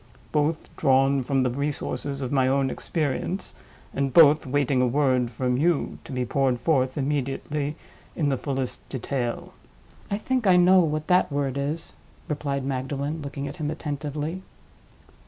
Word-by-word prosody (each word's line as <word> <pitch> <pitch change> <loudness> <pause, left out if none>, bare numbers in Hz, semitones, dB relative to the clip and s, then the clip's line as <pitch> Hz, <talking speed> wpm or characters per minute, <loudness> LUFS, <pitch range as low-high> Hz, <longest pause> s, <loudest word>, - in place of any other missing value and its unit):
Both 155 +1 -1
drawn 135 +1 +3
from 135 +1 +1
the 125 - +1
resources 140 0 -3
of 125 - -3
my 135 -2 +3
own 135 0 +2
experience, 165 +4 -2 0.4
and 135 -1 0
both 155 -1 +6
waiting 135 -1 +1
a 125 - +3
word 130 -2 +2
from 125 +1 -1
you, 165 +2 +1
to - - -9
be 125 -1 -1
poured 130 0 +1
forth 130 -1 +1
immediately 145 +1 -2 0.4
in 150 -4 +1
the 135 - +2
fullest 135 -1 -4
detail." 125 -2 -3 0.6
"I 200 - 0
think 255 0 -1
I 185 - +6
know 180 +1 +6
what 155 -3 0
that 180 -3 +3
word 140 -2 -1
is," 145 +4 -3 0.3
replied 140 -2 -2
Magdalen, 140 +3 -3
looking 140 0 -5
at 145 - -7
him 150 -3 -2
attentively. 150 +2 -4
140 Hz, 155 wpm, -25 LUFS, 130-150 Hz, 0.6 s, both